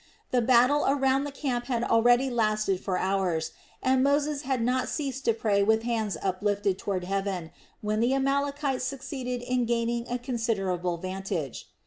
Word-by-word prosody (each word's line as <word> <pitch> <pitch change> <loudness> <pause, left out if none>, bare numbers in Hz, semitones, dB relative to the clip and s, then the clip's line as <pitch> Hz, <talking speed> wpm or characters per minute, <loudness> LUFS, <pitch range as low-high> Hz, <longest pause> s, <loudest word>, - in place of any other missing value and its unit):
The 250 - +3
battle 250 +4 +4
around 270 0 +2
the 290 - -4
camp 255 -4 -2
had 240 -2 -1
already 245 +3 +4
lasted 215 -4 +1
for 185 -1 -2
hours 180 -4 0 0.3
and 260 0 +3
Moses 285 +1 +1
had 265 -4 -1
not 255 +2 0
ceased 270 -3 -3
to 230 - +4
pray 210 -3 +1
with 220 +2 +3
hands 220 -6 -1
uplifted 200 0 0
toward 190 -3 -2
heaven, 195 -3 -2 0.3
when 215 0 -1
the 240 +4 +2
Amalekites 280 0 0
succeeded 260 -2 -4
in 250 0 0
gaining 235 0 -1
a 245 - -1
considerable 195 -8 -1
vantage. 185 - -4
235 Hz, 155 wpm, -27 LUFS, 195-265 Hz, 0.3 s, battle